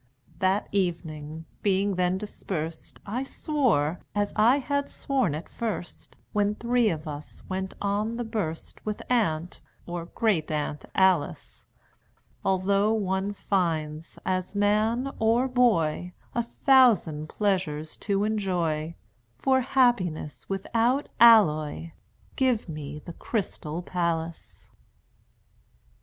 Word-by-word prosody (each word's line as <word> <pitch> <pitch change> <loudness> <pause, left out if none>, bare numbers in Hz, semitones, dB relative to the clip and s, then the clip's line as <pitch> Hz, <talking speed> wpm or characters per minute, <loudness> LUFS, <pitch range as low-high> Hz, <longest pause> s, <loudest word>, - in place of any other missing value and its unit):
That 190 +2 +1
evening, 160 -5 -2 0.2
being 200 0 +2
then 180 0 +1
dispersed 165 -5 -5
I 235 +6 -2
swore 235 - 0 0.2
(as 205 0 0
I 230 +5 +5
had 285 0 -1
sworn 260 - 0
it 155 - -6
first 205 -7 -5 0.2
When 205 0 +2
three 235 0 +2
of 155 -2 -4
us 150 0 -8
went 190 0 -3
on 205 +3 -1
the 240 - -2
burst 200 -8 -4
With 215 -1 -4
Aunt, 175 -8 0 0.2
or 175 -1 -5
Great 190 -6 0
Aunt, 150 -1 -2
Alice), 185 -6 +1 0.8
"Although 195 +3 +2
one 195 -2 0
finds, 165 -6 -2
as 185 +1 -1
man 215 +6 +2
or 230 +4 +3
boy, 180 -9 +2 0.2
A 240 - +1
thousand 230 - +3
pleasures 165 -7 -1
to 200 -1 0
enjoy, 175 -7 -1 0.4
For 260 - +3
happiness 195 - +1
without 230 +7 0
alloy 165 -9 +5 0.4
Give 255 -6 +1
me 150 -2 -6
the 170 - -7
Crystal 175 -5 -3
Palace!" 170 -2 -3
190 Hz, 110 wpm, -27 LUFS, 165-225 Hz, 0.8 s, I